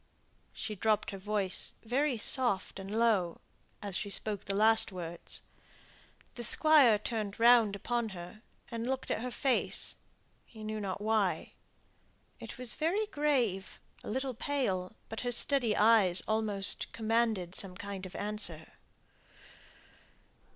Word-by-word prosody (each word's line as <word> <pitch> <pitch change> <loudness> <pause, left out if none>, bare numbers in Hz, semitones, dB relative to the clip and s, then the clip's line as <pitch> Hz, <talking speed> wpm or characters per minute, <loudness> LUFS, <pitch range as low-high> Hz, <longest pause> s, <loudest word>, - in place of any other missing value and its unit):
She 215 - -6
dropped 215 +1 0
her 195 - -7
voice 200 -1 +1
very 255 +3 0
soft 220 -5 +1
and 195 0 -8
low, 210 -6 +1 0.4
as 200 -3 -4
she 205 - -3
spoke 205 0 -2
the 195 - +1
last 220 +1 +5
words. 170 -2 -7 0.9
The 240 - -5
Squire 275 -2 +6
turned 210 -1 -4
round 230 -3 +5
upon 235 +2 -2
her, 180 +2 -10 0.3
and 230 0 -4
looked 265 0 -3
at - - -1
her 250 - -3
face, 260 +1 +1 0.5
he 220 -2 -13
knew 215 0 -4
not 195 0 -4
why. 215 -3 0 0.9
It - - -9
was 250 -3 0
very 370 +8 0
grave, 265 - -1 0.2
a - - -7
little 260 +3 -2
pale, 220 -7 -2
but 225 - -6
her 245 - -2
steady 240 -2 +2
eyes 210 -5 +4
almost 215 -2 +1
commanded 220 -5 0
some 190 -2 -3
kind 200 -2 -6
of 185 - -14
answer. 200 -7 -4
215 Hz, 135 wpm, -31 LUFS, 195-240 Hz, 0.9 s, Squire